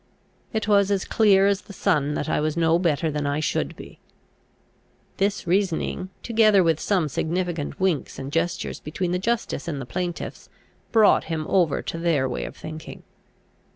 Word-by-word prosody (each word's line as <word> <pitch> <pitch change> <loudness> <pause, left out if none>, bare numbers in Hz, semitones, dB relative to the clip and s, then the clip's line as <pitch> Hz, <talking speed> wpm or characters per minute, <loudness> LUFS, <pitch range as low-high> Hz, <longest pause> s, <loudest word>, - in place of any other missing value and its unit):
It 220 -2 -2
was 200 -2 +4
as 200 -2 0
clear 200 -3 +4
as 200 0 +2
the 200 - -12
sun 150 -5 +1
that - - -2
I - - +1
was 155 +1 -1
no 165 0 +3
better 160 -2 +1
than 150 -1 -2
I 145 +1 0
should 155 - -1
be. - - -12 1.2
This 200 +1 0
reasoning, 185 0 0
together 215 -4 +4
with 165 -2 +2
some 185 -6 +1
significant 170 +1 -2
winks 185 -7 0
and 135 +1 -6
gestures 165 +2 -1
between 175 +4 -3
the 180 - 0
justice 220 -6 -2
and 150 -4 -3
the 135 - -5
plaintiffs, 175 +5 -5 0.4
brought 220 -2 +5
him 160 -1 -3
over 170 -7 +2
to 165 - -4
their 160 -6 +1
way 125 - -3
of - - -9
thinking. 155 0 -9
175 Hz, 170 wpm, -24 LUFS, 155-195 Hz, 1.2 s, brought